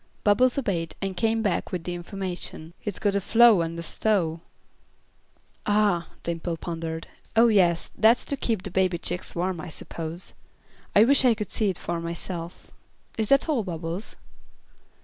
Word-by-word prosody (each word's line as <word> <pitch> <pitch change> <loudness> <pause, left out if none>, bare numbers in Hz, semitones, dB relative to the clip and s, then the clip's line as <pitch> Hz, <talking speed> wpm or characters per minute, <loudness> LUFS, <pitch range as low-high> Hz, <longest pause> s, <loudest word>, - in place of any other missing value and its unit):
Bubbles 240 +6 +4
obeyed, 175 - -1
and 195 -1 -3
came 225 +2 +1
back 200 -5 -1
with 180 -3 -3
the 180 - -3
information. 175 -2 -6
"Hit's 205 -3 -4
got 205 -2 +1
a 200 - +1
flo' 225 -2 +6
an' 165 0 -3
a 170 - -5
stove." 170 -4 0 1.3
"Ah!" 205 -5 +2 0.2
Dimple 170 0 -3
pondered. 165 -1 -5 0.3
"Oh 230 +1 +6
yes, 175 -5 +3
that's 230 +2 +4
to 280 - -1
keep 225 -7 -1
the 195 - -6
baby 185 -1 +2
chicks 175 - -3
warm, 175 -1 -1
I 180 - -7
suppose. 165 +2 -6 0.6
I 205 - +8
wish 270 +3 +5
I 245 -3 +5
could 210 -3 -5
see 210 -3 +1
for 170 -1 -4
myself. 170 0 -6 0.5
Is 220 - 0
that 275 +3 +4
all, 280 -8 +1
Bubbles?" 170 +2 -5
185 Hz, 160 wpm, -26 LUFS, 170-215 Hz, 1.3 s, I